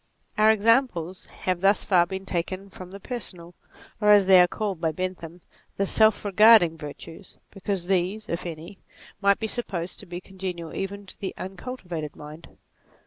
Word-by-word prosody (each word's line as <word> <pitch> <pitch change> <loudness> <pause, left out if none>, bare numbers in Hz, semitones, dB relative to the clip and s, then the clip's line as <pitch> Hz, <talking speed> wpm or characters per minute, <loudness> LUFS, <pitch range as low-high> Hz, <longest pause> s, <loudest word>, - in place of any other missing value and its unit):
Our 215 +1 +5
examples 220 -5 +1
have 185 -1 -3
thus 195 +1 +3
far 175 -3 +4
been 190 +1 -6
taken 185 +2 -4
from 185 -1 -10
the 200 +2 -10
personal, 185 -7 -7 0.5
or 210 - +3
as 205 -2 +7
they 185 -1 +7
are 180 - +5
called 195 -3 -4
by 160 -2 +1
Bentham, 175 0 -6 0.4
the 200 - +1
self 220 +1 +3
regarding 205 -4 +6
virtues, 160 +4 -11
because 195 -2 -3
these, 190 +3 -1
if 170 +1 -4
any, 170 +4 -9 0.4
might 200 -1 +4
be 220 - -4
sup 240 +2 -4
posed 175 -2 -5
to - - -9
be 175 0 -6
congenial 185 -3 -7
even 200 +1 -5
to 185 - -14
the 195 - -5
uncultivated 180 - -6
mind. 150 +2 -11
185 Hz, 170 wpm, -25 LUFS, 175-200 Hz, 0.5 s, as